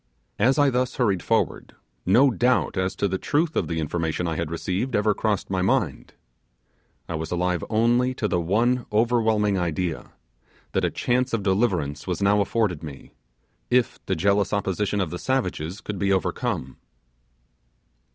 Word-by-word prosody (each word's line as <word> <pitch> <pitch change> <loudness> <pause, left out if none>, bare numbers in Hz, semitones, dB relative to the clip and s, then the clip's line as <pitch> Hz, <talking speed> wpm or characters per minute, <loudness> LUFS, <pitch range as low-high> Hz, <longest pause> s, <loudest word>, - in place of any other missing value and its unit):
As 130 +7 +3
I 145 -2 +4
thus 125 0 0
hurried 100 -8 +1
forward, - - -1 0.3
no 125 +8 +5
doubt 125 +1 +1
as 95 0 -1
to 100 - 0
the 95 0 -2
truth 155 +2 0
of - - 0
the 80 -1 -2
information 80 +2 -2
I 80 - -2
had 85 -1 -2
received 95 +9 -2
ever 105 +1 +3
crossed 105 -2 -1
my 95 -1 0
mind. 90 - -1 0.9
I - - -4
was 80 0 -4
alive 90 0 0
only 120 +3 +2
to 105 - -1
the 90 -3 0
one 120 +8 +1
overwhelming 110 -3 +2
idea, 85 -1 -3 0.6
that - - 0
a - - +2
chance 125 +1 0
of 110 -3 0
deliverance 95 -8 0
was 90 -3 -2
now 100 +1 +3
afforded 100 -5 0
me, 70 -4 -10 0.6
if 125 -1 +1
the - - +1
jealous 100 +5 +1
opposition 100 0 0
of 85 -5 -2
the 90 - -5
savages 95 -9 -2
could 105 -3 -5
be 100 +1 +1
overcome. 75 -7 -1
100 Hz, 160 wpm, -24 LUFS, 90-120 Hz, 0.9 s, no